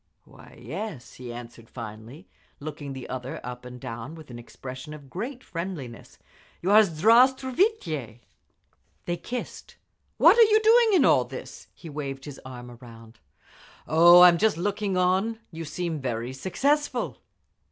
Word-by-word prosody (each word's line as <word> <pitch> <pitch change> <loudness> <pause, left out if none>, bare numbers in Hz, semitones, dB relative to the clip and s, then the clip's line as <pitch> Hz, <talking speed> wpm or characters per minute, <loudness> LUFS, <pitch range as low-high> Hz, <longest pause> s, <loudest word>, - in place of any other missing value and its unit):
"Why - - -17
yes," 185 - -7
he 125 -1 -9
answered 120 -1 -10
finally, 115 - -10 0.3
looking 145 -1 -7
the 130 -2 -8
other 130 +1 -6
up 125 0 -8
and 125 0 -9
down 120 +4 -7
with 155 -5 -13
an 120 - -8
expression 130 +4 -9
of 140 -3 -15
great 245 +7 -6
friendliness. 165 -9 -7 0.4
"You 185 - -1
are 210 - +8
S—. 215 -3 +4
Zdra'stvuitye!" 230 - +2 0.8
They 175 0 -2
kissed. 245 +9 -7 0.4
"What 475 - +6
are - - +9
you 435 -1 +6
doing 445 0 +5
in 325 -8 +5
all 125 - +4
this?" 130 +1 -10
He 170 - -12
waved 140 -3 -6
his 145 -2 -9
arm 125 -1 -9
around. 115 -2 -14 0.7
"Oh, 175 +3 +7
I'am 175 -2 +7
just 220 -4 +2
looking 200 +1 -1
on…. 190 +5 +1
You 165 0 -7
seem 165 +1 -3
very 120 0 -3
successful." 275 - -1
155 Hz, 150 wpm, -26 LUFS, 125-205 Hz, 0.8 s, are